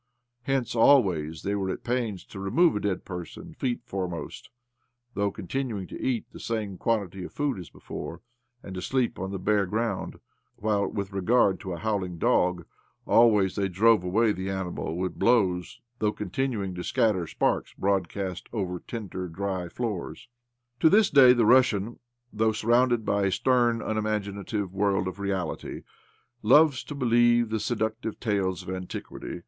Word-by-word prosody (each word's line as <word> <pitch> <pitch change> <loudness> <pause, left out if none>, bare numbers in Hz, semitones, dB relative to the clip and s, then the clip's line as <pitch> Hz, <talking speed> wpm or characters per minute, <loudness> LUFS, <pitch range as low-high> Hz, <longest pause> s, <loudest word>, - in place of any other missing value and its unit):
Hence 135 -4 0
always 95 - +3
they, 100 - -1
were 95 -2 -1
at - - -4
pains 120 -6 -2
to 100 - -10
remove 160 - +3
a - - 0
dead 100 -3 -2
person 95 - -8
feet 130 -6 -2
foremost 90 -4 -5 0.3
— 120 +1 -48
though 100 0 0
con 100 0 -9
tinuing 115 -5 -3
to - - -8
eat 125 -4 -1
the - - -11
same 105 -5 -3
quantity 100 -5 -1
of - - -8
food 145 -8 -1
as 90 - -9
before, - - -8 0.4
and 95 - -8
to 90 - -5
sleep 125 +2 -1
on 95 +1 -3
the 95 - -4
bare 100 +1 +1
ground; 110 0 -2 0.4
while, 105 -2 0
with 100 -1 -4
regard 100 0 +3
to 95 - -5
a - - -5
howling 95 -2 -2
dog, 90 +1 +2 0.4
always 105 -6 +4
they 100 -1 0
drove 110 +2 +4
away 105 +5 +2
the 95 -1 -4
animal 90 -3 -3
with 90 0 -3
blows 95 -7 +2
— 120 0 -45
though 105 -1 +2
continuing 105 -1 -2
to 90 0 -5
scatter 95 -6 +1
sparks - - -1
broad 95 -3 0
cast 95 -3 -5
over 90 -5 -3
trader 95 -5 -6
dry 95 0 -3
floors. 110 +1 -5 0.5
To 160 - +6
this 210 +2 +4
day 130 -3 +8
the 120 -3 +3
Russian, 120 -3 +3 0.3
though 110 +1 +2
sur 110 +1 -4
rounded 120 -2 +3
by 100 -1 +1
a - - 0
stern, 120 +3 +2
unimaginative 105 -2 -2
world 95 -1 +1
of 95 +2 -6
reality, 95 -4 -3 0.6
loves 140 +5 +5
to 145 - -7
believe 120 -2 +3
the 110 0 -1
seductive 110 0 -2
tales 95 -5 -1
of - - -6
antiquity. 95 -1 -6
105 Hz, 170 wpm, -27 LUFS, 95-120 Hz, 0.6 s, day